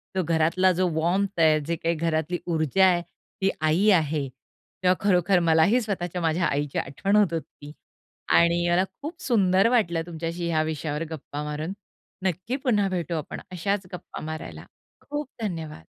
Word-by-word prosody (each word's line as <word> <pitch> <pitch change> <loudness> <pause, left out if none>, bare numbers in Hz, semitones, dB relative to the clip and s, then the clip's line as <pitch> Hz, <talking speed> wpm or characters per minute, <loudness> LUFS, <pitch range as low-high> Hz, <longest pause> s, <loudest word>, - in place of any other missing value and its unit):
जो 185 - +1
घरातला 165 +3 +3
जो 185 - +3
वार्म्थ 185 +3 0
आहे 155 -1 +5
जे 170 - 0
काही 165 +1 -1
घरातली 165 +1 -1
ऊर्जा 165 +2 +2
आहे 180 -2 +3 0.4
ती 190 - +3
आई 160 +7 +3
आहे. 155 -6 +2 0.6
तेव्हा 180 0 +4
खरोखर 180 -1 +4
मलाही 170 +8 +4
स्वतःच्या 180 -5 -3
माझ्या 165 +1 +1
आईची 145 -1 -1
आठवण 195 +9 -1
होत 205 -5 +4
होती 150 -2 -6 0.6
आणि 170 0 +4
मला 175 +2 +3 0.2
खूप 325 +5 -7
सुंदर 195 - +3
वाटलं 175 -9 +2
तुमच्याशी, 170 +1 -4
ह्या 160 -2 +2
विषयावर 155 0 -3
गप्पा 145 -1 -6
मारून. 150 +4 -4 0.5
नक्की 190 +6 -1
पुन्हा 210 -7 +2
भेटू 175 -2 -2
आपण 155 -2 -5
अशाच 190 +2 -1
गप्पा 180 - -8
मारायला. 155 0 -7 0.4
खूप 295 0 -3
धन्यवाद! 160 - -5
170 Hz, 155 wpm, -25 LUFS, 160-190 Hz, 0.6 s, आहे